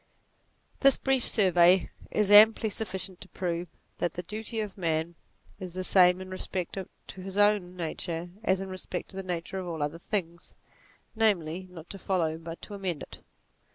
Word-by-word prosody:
This 275 -1 +5
brief 270 -2 +1
survey 180 -2 +4 0.2
is 210 -1 +1
amply 220 +1 +8
sufficient 190 -3 -4
to 190 - -10
prove 175 -1 -3 0.3
that 175 - -1
the 180 - -4
duty 220 +4 -5
of 210 -3 -4
man 165 -2 -1 0.5
is 185 -3 -7
the 185 0 -3
same 180 -1 +5
in 185 0 -8
respect 185 -1 -2 0.3
to 190 - -10
his 190 +1 -7
own 205 -3 +3
nature 170 0 -4
as 190 -3 +2
in 195 - -5
respect 185 -1 -5
to - - -14
the 195 - -3
nature 180 +1 -4
of 185 - -5
all 160 -3 -3
other 150 +3 -3
things, 170 -3 -4 0.6
namely 185 -5 +1
not 170 -2 -11
to 195 - -8
follow 165 -5 0
but 165 0 -9
to 210 - -8
amend 185 -6 -3
it. - - -11
185 Hz, 175 wpm, -28 LUFS, 170-200 Hz, 0.6 s, amply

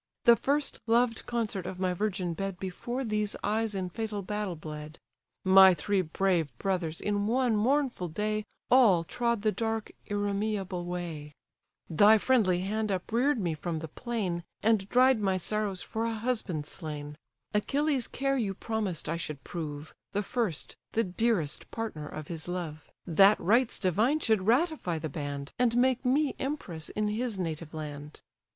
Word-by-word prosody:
The 235 -3 +8
first 285 +4 0
loved 230 0 +2
consort 220 -6 -2
of 185 - -6
my 185 -1 +1
virgin 185 -2 -1
bed 195 +2 -4
Before 240 +8 -4
these 210 -3 0
eyes 215 +1 0
in 185 -2 -3
fatal 210 0 -3
battle 210 -2 -3
bled: 155 0 -8 0.5
My 190 -1 +8
three 190 +5 +1
brave 175 -2 +1
brothers 175 -4 -1
in 205 0 0
one 245 0 +2
mournful 250 -3 +1
day 215 +5 -1 0.3
All 220 -10 +6
trod 235 +3 -1
the 215 - +3
dark, 225 0 -2 0.2
irremeable 205 -3 -1
way: 170 -4 -5 0.5
Thy 205 +6 +6
friendly 205 -7 +3
hand 215 +2 -1
uprear'd 235 +9 +1
me 175 -5 0
from 160 +2 -3
the 160 +1 -5
plain, 190 - -3 0.2
And 210 -3 +2
dried 255 -1 +5
my 190 -2 +1
sorrows 205 0 -2
for 225 +1 -2
a 230 -1 -1
husband 215 -9 -2
slain; 150 -2 -6 0.4
Achilles' 275 +4 +1
care 275 0 0
you 200 -4 -1
promised 210 -6 -3
I 165 - -1
should 150 -5 -5
prove, 150 -3 -6 0.2
The 205 +1 0
first, 215 - -2 0.2
the 230 - +2
dearest 185 -5 0
partner 210 -10 -5
of 155 -1 -7
his 165 -1 -5
love; 165 -4 -5 0.2
That 195 +4 +6
rites 230 +7 +3
divine 215 - +2
should 220 -8 +1
ratify 255 - +2
the 155 0 -4
band, 140 -1 -5
And 240 -1 +3
make 255 0 +3
me 275 +3 +2
empress 190 - -3
in 215 0 -1
his 225 0 -2
native 165 -3 -4
land. 150 -1 -7
200 Hz, 160 wpm, -29 LUFS, 170-230 Hz, 0.5 s, The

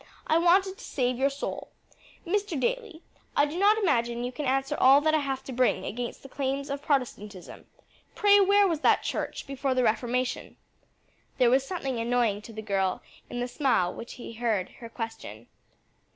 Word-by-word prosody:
I 320 - +3
wanted 380 +3 +3
to - - -11
save 250 -2 -1
your 275 +1 +3
soul. 280 +1 -5 0.6
Mr. 400 -3 -1
Daly, 450 - -2 0.3
I 290 - +5
do 305 +4 -5
not 415 +2 +5
imagine 240 - 0
you 245 - -3
can 280 +2 -4
answer 270 +3 0
all 270 +2 +7
that 310 +1 +2
I 310 - +4
have 270 -2 -3
to 265 - -7
bring 245 -6 +1
against 240 +3 -5
the - - -9
claims 275 +1 -3
of 280 0 -3
Protestantism. 215 - -3 0.5
Pray 410 -1 +5
where 400 +1 +5
was 330 -4 -1
that - - +3
church - - -3
before 275 -1 -2
the 255 - +2
Reformation?" 245 +3 -1 0.8
There 245 -2 +4
was 265 +1 +2
something 270 -9 -3
annoying 230 -3 +1
to 225 - -11
the 220 0 -7
girl 195 -3 -1 0.3
in 245 - -4
the 245 - -1
smile 245 - +1
with - - -12
which 235 - -8
he 240 - -9
heard 220 -5 -1
her 230 - -9
question. 225 - -7
265 Hz, 185 wpm, -27 LUFS, 235-310 Hz, 0.8 s, all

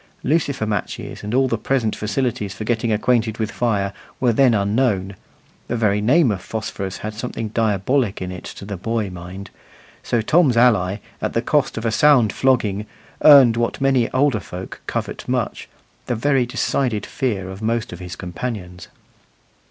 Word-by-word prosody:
Lucifer 140 -5 0
matches 105 -3 -4
and 105 - -4
all 130 +2 +3
the 115 -3 -1
present 120 -5 0
facilities 105 -2 -2
for 110 - -5
getting 115 0 0
acquainted 110 0 +1
with 110 -2 -2
fire 100 -5 0 0.3
were 125 -2 +3
then 125 -1 +4
unknown 100 -2 0 0.5
the 120 - -2
very 105 -3 +1
name 130 +4 +4
of 95 -3 -3
phosphorus 100 -2 -5
had 110 - -4
something 115 0 -4
diabolic 110 +2 0
in 90 0 -4
it 90 - -8
to - - -9
the 100 -1 -5
boy 110 +1 -2
mind; 90 +3 -9 0.5
so 120 - 0
Tom's 135 +2 +3
ally, 105 -6 +4 0.2
at - - -2
the - - +1
cost - - +1
of 115 - -4
a 115 - +1
sound 135 -5 +4
flogging, 110 -6 +1 0.4
earned 135 -6 +8
what 115 0 -1
many 135 -3 +2
older 130 -4 +2
folk 90 -1 -8
covet - - -4
much - - -2 0.4
the 120 - 0
very 130 +1 +1
decided 120 -3 -1
fear 105 -9 -2
of 95 +2 -9
most 115 -2 -1
of 90 - -9
his 90 -1 -7
companions. 90 -2 -6
110 Hz, 170 wpm, -21 LUFS, 100-125 Hz, 0.5 s, earned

